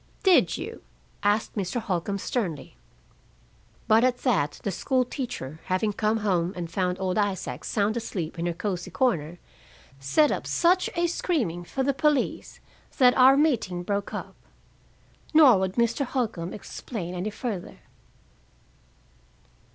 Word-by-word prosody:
"Did 380 -3 +4
you?" - - -7 0.4
asked 205 +1 +1
Mr. 200 +3 -2
Holcombe 195 -1 -2
sternly. 175 - -3 1.1
But 220 +2 +5
at 255 -1 +2
that, 170 - +1
the 200 - -1
school 255 +7 0
teacher, 195 - -6
having 190 +3 0
come 215 +2 +1
home 180 -2 +1
and 170 -2 -5
found 180 0 -1
old 190 +2 0
Isaac 200 -2 -2
sound 210 +1 0
asleep 180 -8 -4
in 170 - -1
her 175 - -1
cozy 185 0 -4
corner, 175 - 0 0.6
set 215 - +3
up - - -3
such 355 +2 +2
a 345 0 +2
screaming 265 - -1
for 265 +9 -3
the 280 +1 +1
police 295 -1 0 0.4
that 250 -3 +6
our 265 +1 +7
meeting 230 - +1
broke 200 +2 -2
up. - - -6 1.0
Nor 270 -10 +8
would 190 0 -2
Mr. 235 +3 +1
Holcombe 225 -10 -2
explain 200 -4 -6
any 180 +4 -3
further. 215 -4 -5
205 Hz, 135 wpm, -26 LUFS, 180-255 Hz, 1.1 s, Nor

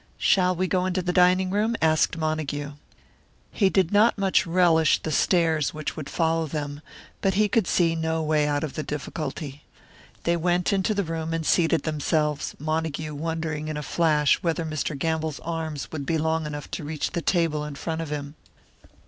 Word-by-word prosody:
"Shall 185 -1 +3
we 185 +2 0
go 185 0 0
into 185 0 -1
the 180 0 -1
dining 185 +1 +4
room?" 215 +3 +1
asked 155 +1 +2
Montague. 155 -2 -2 0.8
He 195 -3 +2
did 190 -3 +2
not 210 +3 +4
much 195 -2 +2
relish 165 -3 +4
the 160 - -4
stares 160 -2 +2
which 155 -3 -4
would 150 -3 -6
follow 165 -1 0
them, 145 -1 -4 0.4
but 195 -2 +1
he 210 +1 +4
could 205 -2 +1
see 170 -2 +2
no 160 0 -1
way 150 -1 +2
out 145 0 0
of 150 - -4
the - - -3
difficulty. 145 -1 -5 0.6
They 170 - +2
went 175 +2 +1
into 200 +2 +1
the 200 - +1
room 165 -1 -3
and 160 -1 -3
seated 165 -1 +3
themselves, 150 -1 -1
Montague 155 0 -2
wondering 160 0 -3
in 155 -1 -3
a 150 - -4
flash 150 -3 +2
whether 165 -1 -1
Mr. 155 -1 -3
Gamble's 160 0 -1
arms 160 -3 -4
would 145 -3 -5
be 165 - +1
long 160 0 0
enough 145 -1 -7
to - - -4
reach 150 0 -3
to - - -24
the 170 - -1
table 165 -4 +1
in 150 -1 -6
front 160 +3 -3
of 160 - -5
him. 145 -1 -4
160 Hz, 190 wpm, -25 LUFS, 150-175 Hz, 0.8 s, dining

